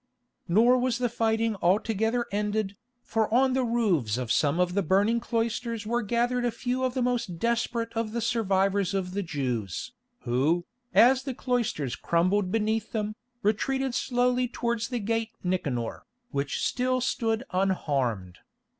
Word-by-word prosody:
Nor 235 +8 +5
was 250 -1 +1
the 245 -1 0
fighting 225 -1 +1
altogether 225 +5 +1
ended, 210 0 -1 0.3
for 220 -1 0
on 260 +2 +4
the 260 0 +1
roofs 195 - +1
of 125 -3 -3
some 145 +6 +2
of 180 0 +2
the 200 - +2
burning 200 +6 +2
cloisters 230 -1 -2
were 240 +2 0
gathered 240 +3 0
a 240 - +2
few 245 +3 -2
of 255 0 0
the 255 - +1
most 240 -8 -1
desperate 230 +2 -1
of 225 -1 -1
the 235 - -2
survivors 200 -4 +1
of 185 -2 -2
the 200 +2 -2
Jews, 130 - -3 0.3
who, 145 +8 +1 0.3
as 255 +3 +6
the 260 -1 -5
cloisters 230 - -1
crumbled 185 +6 +1
beneath 220 0 0
them, 215 -1 -1 0.3
retreated 265 +5 0
slowly 250 0 +1
towards 235 -1 -2
the 245 - -3
Gate 225 +1 -1
Nicanor, 140 -11 -2 0.2
which 140 -2 -1
still 255 0 +1
stood 230 -2 0
unharmed. 135 - -1
220 Hz, 150 wpm, -27 LUFS, 180-240 Hz, 0.3 s, as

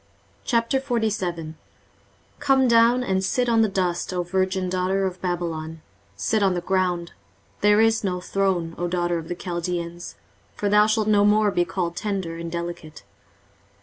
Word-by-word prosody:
23:047:001 225 - -1 0.9
Come 270 -2 +3
down, 235 +1 +4
and 190 -4 0
sit 245 +6 0
in 230 -1 +3
the 220 - +4
dust, 180 -3 -1
O 180 -1 -1
virgin 185 +1 -1
daughter 185 +2 0
of 185 -1 -4
Babylon, 165 -3 -3 0.3
sit 100 - 0
on 190 -2 +2
the 175 - -2
ground: 180 -2 -1 0.5
there 210 +1 +4
is 225 0 +3
no 180 -2 -1
throne, 180 -3 -1
O 175 - -1
daughter 175 -1 0
of 160 - -9
the 175 - -4
Chaldeans: 175 -1 -4 0.4
for 205 - -1
thou 210 +1 +5
shalt 215 -1 +1
no 205 -1 +4
more 210 0 +4
be 175 -2 +1
called 170 0 -3
tender 190 -5 -3
and 170 0 -6
delicate. 170 -5 -6
185 Hz, 155 wpm, -23 LUFS, 175-210 Hz, 0.9 s, thou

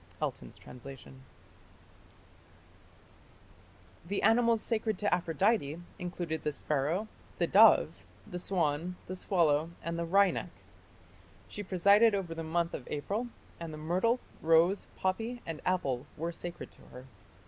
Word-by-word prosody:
Elton's - - -4
translation. 135 +1 -11 2.9
The 200 +2 -2
animals 230 +1 +4
sacred 220 -3 -1
to 205 +1 +1
Aphrodite 170 -2 +1 0.2
included 175 -3 -4
the 150 - 0
sparrow, 150 +8 -1 0.3
the - - +2
dove, - - +7 0.4
the 180 - -6
swan, 175 -1 -1
the 185 - -6
swallow, 165 -5 +2
and 170 0 -3
the 170 - -1
wryneck. 195 +2 +3 1.0
She 210 - -7
presided 200 +3 +4
over 185 -4 -3
the 165 - -5
month 170 +1 -1
of 125 - -6
April, 205 +11 -2 0.3
and 165 -1 -6
the 155 - -7
myrtle, 185 +10 +1 0.2
rose, 165 +4 +3
poppy, 225 +6 -2
and 165 -2 -5
apple 140 -8 0
were 165 +2 -2
sacred 175 +1 -7
to - - -18
her. 125 +1 -11
175 Hz, 125 wpm, -31 LUFS, 155-200 Hz, 2.9 s, dove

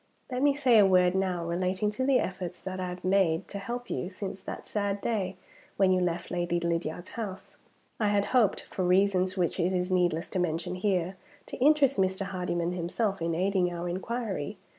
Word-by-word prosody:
"Let 250 0 -1
me 285 0 +4
say 255 -6 +5
a 205 - +7
word 180 -1 +4
now 185 -3 0
relating 185 +4 0
to 260 +5 -3
the 270 -2 +5
efforts 185 -4 -3
that 190 0 -5
I 180 -1 -2
have 180 0 -7
made 185 -4 +2
to 200 - -5
help 245 +4 -5
you, 180 - -2
since 190 0 -6
that - - -7
sad 200 -1 -1
day 200 -4 -1 0.4
when 195 -1 +4
you 185 0 +3
left 175 -1 -2
Lady 175 -1 0
Lydiard's 170 0 -2
house. 195 -3 -6 0.4
"I 215 - +2
had 205 0 +2
hoped 230 -6 +3
(for 185 - -4
reasons 185 +1 +2
which 180 +1 0
it 180 +2 +1
is 180 0 -1
needless 175 -2 +1
to 185 - -1
mention 165 0 -1
here) 185 -1 0 0.3
to - - -8
interest 280 -1 +4
Mr. 190 +1 +1
Hardyman 180 -3 -2
himself 180 +3 -2
in 165 0 0
aiding 185 0 +1
our 175 0 -4
inquiry. 195 -1 -3
185 Hz, 195 wpm, -29 LUFS, 180-200 Hz, 0.4 s, a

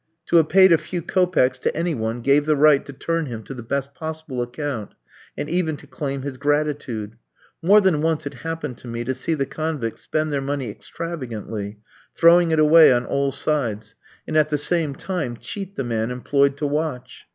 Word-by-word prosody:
To 170 - +5
have 160 -2 +4
paid 190 +1 +7
a 165 - +6
few 170 +1 -5
kopecks 175 -10 +2
to - - -1
any 170 0 0
one 115 -1 -3
gave 140 +4 +3
the 155 - +4
right 150 -1 +5
to - - -6
turn 165 +3 -2
him 115 -3 -6
to 135 - -8
the 125 - -8
best 140 +4 -3
possible 160 -5 -5
account, 125 -2 -4 0.4
and 145 - -3
even 160 -2 0
to - - -15
claim 140 -2 -4
his 140 -2 -5
gratitude. 140 -7 -1 0.4
More 200 +5 +6
than 180 -6 +2
once 160 -1 0
it 140 - -5
happened 160 -2 -5
to - - -12
me 115 0 -4
to 130 +2 -1
see 145 +5 -2
the 140 -2 -1
convicts 150 -7 -4
spend 155 -1 -1
their 140 - 0
money 135 -4 -3
extravagantly, 110 -9 -6 0.4
throwing 170 0 +6
it 160 - +2
away 155 0 +7
on 120 0 +2
all 140 0 0
sides, 120 -7 -2 0.3
and, - - -4
at 155 -1 +4
the 150 - +1
same 155 -1 0
time, 150 -9 -4
cheat 195 - -7
the 135 - -2
man 115 -1 -1
employed 140 +3 +1
to 150 - -2
watch. 145 -3 -3
145 Hz, 200 wpm, -22 LUFS, 125-160 Hz, 0.4 s, paid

